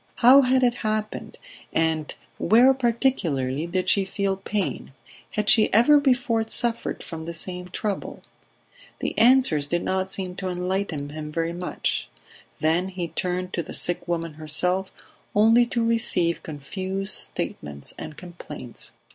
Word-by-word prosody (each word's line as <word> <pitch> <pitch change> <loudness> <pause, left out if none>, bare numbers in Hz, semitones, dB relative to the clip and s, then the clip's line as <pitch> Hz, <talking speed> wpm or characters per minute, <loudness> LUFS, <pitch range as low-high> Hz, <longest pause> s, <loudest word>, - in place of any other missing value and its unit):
How 260 +4 +7
had 260 0 +3
it 245 -1 +4
happened, 215 -1 -3 0.3
and 160 -2 0 0.2
where, 245 +5 +5
particularly, 175 - 0
did 185 +1 -2
she 200 - +4
feel 195 0 -1
pain... 195 -6 -3 0.4
Had 210 0 -1
she 220 -1 +5
ever 245 +8 +6
before 255 -4 +2
suffered 235 +1 -2
from 160 -1 -7
the 170 0 -6
same 180 +1 -6
trouble... 200 +2 -4 0.8
The - - -3
answers 235 - +4
did 175 +3 -1
not 190 0 -1
seem 185 -1 -4
to 190 - -3
enlighten 180 -5 -2
him 150 0 -7
very 165 +1 -2
much; 180 +1 -2 0.5
then 165 +4 +2
he 180 -3 -4
turned 180 +3 -3
to 170 - 0
the - - -6
sick 175 0 +2
woman 165 -2 -2
herself, 180 +5 0 0.4
only 225 +3 +5
to 235 -1 0
receive 225 -7 +1
confused 190 +7 -4
statements 70 -1 -4
and 150 - -8
complaints. 160 -8 -7
185 Hz, 140 wpm, -24 LUFS, 165-225 Hz, 0.8 s, How